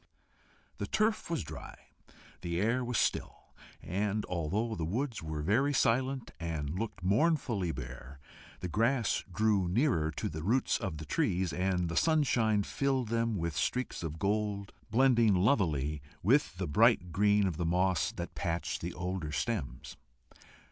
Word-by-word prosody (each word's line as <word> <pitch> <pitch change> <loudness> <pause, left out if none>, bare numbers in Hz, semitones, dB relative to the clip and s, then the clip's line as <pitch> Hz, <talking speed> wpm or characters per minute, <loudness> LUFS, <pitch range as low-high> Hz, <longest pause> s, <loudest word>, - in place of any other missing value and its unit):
The - - -2
turf 215 -2 +1
was 170 - -1
dry, 75 -1 -9 0.7
the 85 0 -2
air 115 +6 +1
was 120 -2 -1
still, - - -1 0.3
and 105 +3 -1
although 95 +7 -1
the 85 - -3
woods 115 - -2
were 80 -2 -4
very 125 - +2
silent, 130 0 +1
and 80 -4 -3
looked 95 +1 -4
mournfully 110 - +1
bare, 65 +1 -8 0.4
the 90 - -2
grass 115 +6 +1
drew 105 -2 +2
nearer 90 - +2
to 75 - -3
the 80 0 -5
roots 115 +10 +1
of 95 -8 -4
the 80 - -7
trees, 90 +3 0
and 90 +1 0
the 85 - -4
sunshine 120 - +3
filled 130 0 -1
them 115 -1 0
with 85 -3 -2
streaks 125 0 -1
of 80 -2 -4
gold, 100 +1 -1 0.2
blending 120 -4 +4
lovelily 80 - +1 0.2
with - - +3
the - - -2
bright 100 +1 +4
green 105 +2 +3
of 90 -5 -1
the 85 - -1
moss 90 +1 +2
that - - -6
patched 85 0 -2
the - - -4
older 90 -3 -3
stems. 70 - -3
100 Hz, 150 wpm, -31 LUFS, 85-115 Hz, 0.7 s, blending